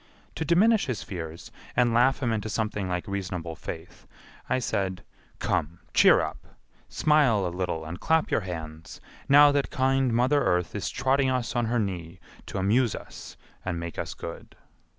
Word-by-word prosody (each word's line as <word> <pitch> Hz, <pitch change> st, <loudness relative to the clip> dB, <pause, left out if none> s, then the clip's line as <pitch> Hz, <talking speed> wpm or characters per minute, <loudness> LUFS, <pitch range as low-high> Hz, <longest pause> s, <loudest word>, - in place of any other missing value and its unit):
To 160 Hz, -, -3 dB
diminish 200 Hz, +7 st, +3 dB
his 125 Hz, -4 st, -3 dB
fears 85 Hz, -3 st, -7 dB, 0.2 s
and 120 Hz, -1 st, +3 dB
laugh 130 Hz, +4 st, +3 dB
him 115 Hz, -2 st, +1 dB
into 110 Hz, 0 st, -3 dB
something 105 Hz, -3 st, -2 dB
like 90 Hz, -1 st, -3 dB
reasonable 90 Hz, -4 st, -4 dB
faith, 80 Hz, +2 st, -9 dB, 0.4 s
I -, -, +2 dB
said, 95 Hz, -7 st, -2 dB, 0.3 s
"Come, 80 Hz, +4 st, -1 dB, 0.2 s
cheer -, -, +6 dB
up; -, -, -4 dB, 0.5 s
smile 140 Hz, -10 st, +3 dB
a -, -, 0 dB
little 90 Hz, -3 st, -2 dB
and 85 Hz, +3 st, -6 dB
clap 160 Hz, -1 st, +1 dB
your -, -, +2 dB
hands, 80 Hz, -3 st, -7 dB, 0.3 s
now 145 Hz, +1 st, +8 dB
that 140 Hz, -1 st, 0 dB
kind 135 Hz, -2 st, +1 dB
Mother 130 Hz, +5 st, +3 dB
Earth 90 Hz, -1 st, +1 dB
is 95 Hz, -3 st, -3 dB
trotting 135 Hz, 0 st, +1 dB
us 125 Hz, -2 st, -1 dB
on 120 Hz, -1 st, +1 dB
her 120 Hz, +2 st, 0 dB
knee 90 Hz, -5 st, -3 dB, 0.3 s
to -, -, -5 dB
amuse 110 Hz, +5 st, +2 dB
us -, -, -10 dB, 0.3 s
and 85 Hz, -2 st, -3 dB
make 85 Hz, 0 st, -6 dB
us -, -, -4 dB
good." 85 Hz, -, -9 dB
105 Hz, 170 wpm, -27 LUFS, 90-130 Hz, 0.5 s, now